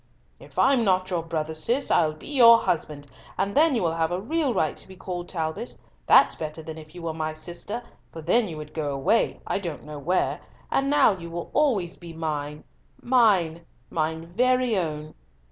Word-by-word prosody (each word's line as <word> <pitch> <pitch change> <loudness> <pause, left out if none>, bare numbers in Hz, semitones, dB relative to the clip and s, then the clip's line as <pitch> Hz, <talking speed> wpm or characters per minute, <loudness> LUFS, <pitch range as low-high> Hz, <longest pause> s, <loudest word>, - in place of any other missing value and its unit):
"If - - -16
I'm 265 -3 +4
not 185 -2 +1
your 175 -2 0
brother, 160 -1 -3
Cis, 235 - -1
I'll 155 -1 +3
be 155 - -14
your 235 -5 +8
husband, 150 -8 -2 0.3
and 195 +1 -1
then 305 -1 +4
you 225 - 0
will 165 -1 +1
have 165 -1 0
a 180 - -1
real 295 +6 0
right 160 -9 0
to - - -10
be 190 - -12
called 180 -1 -6
Talbot. 165 +6 -4 0.3
That's - - +7
better 155 0 -6
than 160 0 -7
if 155 +2 -14
you 175 - -9
were 165 -1 -2
my 155 0 -3
sister, 175 +8 -6 0.3
for 160 - -9
then 215 +7 +2
you 160 -3 -7
would 150 0 -9
go 145 -3 -2
away, 135 +12 +1
I - - -1
don't 170 -7 -5
know 150 0 -8
where, 175 +6 0 0.3
and 275 0 +1
now 285 -8 +4
you 170 -2 -9
will 170 0 -6
always 210 - +1
be 170 -1 -10
mine—mine—mine 160 - -1
very 255 +1 +2
own." 155 -4 -3
170 Hz, 190 wpm, -25 LUFS, 155-225 Hz, 0.3 s, your